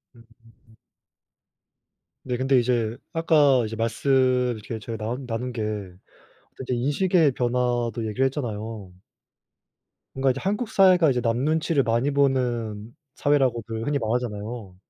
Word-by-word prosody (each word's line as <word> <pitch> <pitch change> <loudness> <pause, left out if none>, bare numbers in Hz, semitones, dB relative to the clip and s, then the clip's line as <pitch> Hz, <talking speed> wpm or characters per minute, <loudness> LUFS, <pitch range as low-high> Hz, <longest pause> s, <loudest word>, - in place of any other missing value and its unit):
음음음. 115 0 -22 1.8
네. 125 -1 -3
근데 130 0 +3
이제 120 -2 0 0.2
아까 150 -6 +4
이제 110 +1 -5
말씀 115 +5 -2 0.4
이렇게 110 +1 -7
저희 115 +1 -6
나온 120 +5 -4
나눈 125 +2 -3
게 115 -2 -5
어떤 100 -4 -7 0.5
이제 125 - -2
인식의 145 +4 +2
변화도 120 -1 0
얘기를 120 +5 +1
했잖아요. 110 -7 -5 1.2
뭔가 135 0 +2
이제 135 - -4
한국 210 +4 -2
사회가 185 -6 +5
이제 125 -2 0
남 115 -1 0
눈치를 155 +1 +1
많이 120 +5 +1
보는 120 -6 0 0.2
사회라고들 120 -6 0
흔히 145 0 0
말하잖아요. 110 -3 -4
120 Hz, 290 characters per minute, -24 LUFS, 115-140 Hz, 1.8 s, 사회가